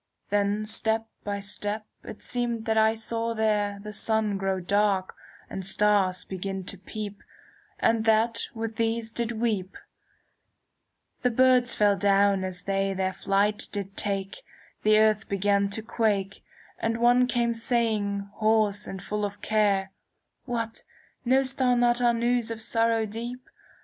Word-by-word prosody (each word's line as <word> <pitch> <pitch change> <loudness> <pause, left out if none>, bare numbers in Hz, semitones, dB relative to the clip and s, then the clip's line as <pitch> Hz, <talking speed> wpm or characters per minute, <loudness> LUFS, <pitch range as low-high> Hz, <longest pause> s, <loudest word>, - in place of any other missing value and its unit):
Then 205 +1 +1
step 220 +1 0 0.2
by 200 -1 -3
step 205 +1 -2 0.2
it - - -10
seemed 235 -2 -2
that 220 - +1
I 220 0 +4
saw 230 +1 -3
there 210 -2 0
The 210 0 -7
sun 220 0 +1
grow 195 -1 -1
dark, 200 0 +1 0.3
and 190 - -6
stars 195 -1 +2
begin 190 0 -4
to 195 - -3
peep, 205 0 -7
^ - - -25 0.6
And 225 -1 +2
that 225 +1 +2
with 225 0 -4
these 225 0 0
did 235 0 -2
weep: 215 -5 -2 1.4
The 250 - +2
birds 250 0 +4
fell 205 -1 +3
down 200 0 +3
as 185 -1 -2
they 195 0 -1
their 190 0 -1
flight 200 +2 0
did 195 -1 -5
take; 195 -2 -2 0.4
The 215 0 +4
earth 215 0 +3
began 200 0 +1
to 215 +2 -3
quake; 205 -4 -1 0.4
And 225 0 -1
one 245 +1 +4
came 235 -1 +1
saying, 220 -4 0
hoarse 215 -2 +2
and 190 -1 -6
full 210 +1 -3
of 205 0 -4
care: 200 -3 +1 0.5
'What, 230 -2 -3 0.4
know'st 265 +2 +2
thou 250 -1 +3
not 240 0 +3
our 240 -1 +3
news 235 0 +1
of 230 -1 -5
sorrow 225 0 +1
deep 235 +4 -7
215 Hz, 150 wpm, -26 LUFS, 200-230 Hz, 1.4 s, I